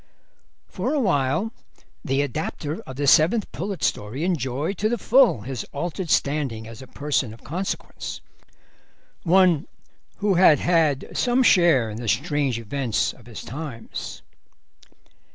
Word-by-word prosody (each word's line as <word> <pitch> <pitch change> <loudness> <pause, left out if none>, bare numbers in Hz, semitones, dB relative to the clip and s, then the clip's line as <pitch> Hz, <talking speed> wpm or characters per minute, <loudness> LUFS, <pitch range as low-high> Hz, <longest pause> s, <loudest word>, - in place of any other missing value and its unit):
For - - -2
awhile 185 - +1 0.5
the 135 +2 +1
adapter 150 - -4
of 130 - -7
the 145 +2 -2
Seventh 170 - +4
Pullet 180 +9 -5
story 110 +9 -1
enjoyed 155 +1 -1
to 215 - +1
the 240 - 0
full 240 - +4
his 125 +3 -5
altered 175 +4 -4
standing 140 -8 0
as 115 +2 -10
a 130 - -11
person 140 -6 -2
of - - -20
consequence, 180 +8 -5 1.0
one 180 -3 +4 0.5
who 205 -1 +1
had 175 -4 +6
had 160 -6 +1
some 250 +1 +2
share 165 - +4
in 105 - -6
the 120 0 -6
strange 140 +1 0
events 115 +1 -1
of - - -18
his 115 - -8
times. 135 -4 -7
150 Hz, 135 wpm, -24 LUFS, 130-180 Hz, 1.0 s, had